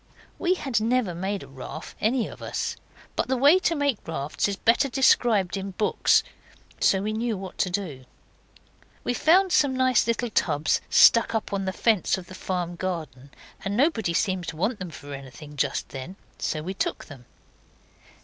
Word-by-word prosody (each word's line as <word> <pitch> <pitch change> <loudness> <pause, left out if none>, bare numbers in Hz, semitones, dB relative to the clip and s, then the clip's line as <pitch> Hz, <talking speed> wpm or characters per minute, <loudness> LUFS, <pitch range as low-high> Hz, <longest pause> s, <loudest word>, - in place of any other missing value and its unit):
We 365 0 +2
had 265 -10 -1
never 230 -4 +1
made 190 +3 -3
a - - -12
raft, 135 +4 -9
any 230 +1 +1
of - - -11
us, - - -3 0.4
but - - 0
the 260 0 0
way 290 +8 +6
to 340 - +1
make 285 -6 0
rafts 150 0 -2
is 200 - -2
better 240 +7 +2
described 230 -7 +3
in 195 0 -5
books, 210 - +3 0.6
so 195 0 +3
we 215 +1 -2
knew 225 -1 -1
what 190 -1 -9
to 185 - +2
do. 175 -9 -4 1.0
We - - 0
found 365 +8 +4
some 275 -6 +3
nice 255 -3 +3
little 230 0 -1
tubs 150 -6 +1
stuck 230 0 +6
up 220 -2 -2
on 195 -1 -1
the 190 - -1
fence 215 -2 +1
of 185 - -8
the 185 - -12
farm 180 -2 -3
garden, 155 -8 -5 0.3
and 200 +2 -2
nobody 230 - +1
seemed 185 -3 0
to 160 - -5
want 205 +6 -1
them 185 -2 -5
for 145 -2 -10
anything 135 +2 -10
just 140 -1 -1
then, 135 +8 -7 0.2
so 155 -1 -2
we 185 +4 -4
took - - -3
them. 135 -5 -13
195 Hz, 180 wpm, -25 LUFS, 170-240 Hz, 1.0 s, way